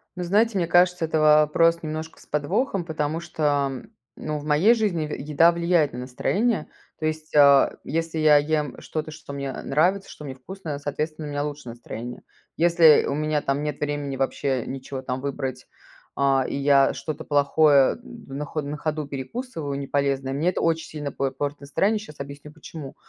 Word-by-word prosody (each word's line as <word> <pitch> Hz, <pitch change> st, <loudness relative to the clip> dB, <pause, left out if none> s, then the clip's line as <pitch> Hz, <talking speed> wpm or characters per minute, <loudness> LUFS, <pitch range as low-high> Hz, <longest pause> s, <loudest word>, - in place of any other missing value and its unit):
Ну 180 Hz, -, -4 dB
знаете, 205 Hz, +4 st, +2 dB
мне 170 Hz, -, 0 dB
кажется, 175 Hz, 0 st, +3 dB
это 160 Hz, 0 st, 0 dB
вопрос 155 Hz, +2 st, +4 dB
немножко 155 Hz, +1 st, -5 dB
с -, -, -17 dB
подвохом, 180 Hz, -, -1 dB
потому 155 Hz, 0 st, -2 dB
что, 150 Hz, -5 st, 0 dB
м, 130 Hz, -, -9 dB, 0.2 s
ну 155 Hz, -1 st, -4 dB
в 145 Hz, -, -10 dB
моей 155 Hz, +10 st, +5 dB
жизни 205 Hz, -9 st, 0 dB
е 150 Hz, -, -4 dB
еда 155 Hz, +3 st, +4 dB
влияет 170 Hz, -4 st, +1 dB
на 125 Hz, -, -5 dB
настроение. 190 Hz, -, -1 dB, 0.3 s
То 155 Hz, -, -3 dB
есть, 155 Hz, 0 st, -4 dB
а, 140 Hz, -2 st, +6 dB
если 165 Hz, +1 st, -2 dB
я 155 Hz, -1 st, +6 dB
ем 150 Hz, -2 st, -1 dB
что-то, 155 Hz, 0 st, -4 dB
что 150 Hz, -2 st, -10 dB
мне, 140 Hz, -1 st, -4 dB
э, -, -, -6 dB
нравится, 185 Hz, +7 st, +1 dB
что 150 Hz, -, -10 dB
мне 135 Hz, -, -6 dB
вкусно, 155 Hz, +1 st, -7 dB
соответственно, 150 Hz, +2 st, -4 dB
у -, -, -6 dB
меня 145 Hz, 0 st, -1 dB
лучше 150 Hz, -3 st, -6 dB
настроение. 120 Hz, +1 st, -8 dB, 0.3 s
Если 170 Hz, -2 st, +6 dB
у -, -, -1 dB
меня 155 Hz, 0 st, 0 dB
там 140 Hz, +2 st, -1 dB
нет 150 Hz, -2 st, -3 dB
времени 145 Hz, -2 st, -3 dB
вообще 135 Hz, -1 st, -1 dB
ничего 130 Hz, 0 st, -6 dB
там 130 Hz, 0 st, -3 dB
выбрать, 135 Hz, -2 st, -4 dB, 0.5 s
э, 135 Hz, -2 st, +2 dB
и -, -, -3 dB
я 140 Hz, -1 st, +4 dB
что-то 155 Hz, -1 st, -5 dB
плохое 145 Hz, -1 st, +4 dB
на 140 Hz, +2 st, -8 dB
хо 155 Hz, -, -3 dB
на 145 Hz, +1 st, -5 dB
ходу 155 Hz, 0 st, -2 dB
перекусываю, 145 Hz, -, -5 dB
неполезное, 140 Hz, -1 st, -1 dB
мне 155 Hz, +6 st, +1 dB
это 180 Hz, -, -2 dB
оч 165 Hz, -1 st, +1 dB
сильно 145 Hz, -2 st, -6 dB
п 135 Hz, 0 st, -1 dB
портит 145 Hz, +2 st, -4 dB
настроение. 195 Hz, +10 st, +1 dB
Щас 180 Hz, -8 st, -12 dB
объясню, 140 Hz, +1 st, -8 dB
почему. 150 Hz, -2 st, -10 dB
150 Hz, 185 wpm, -24 LUFS, 140-165 Hz, 0.5 s, а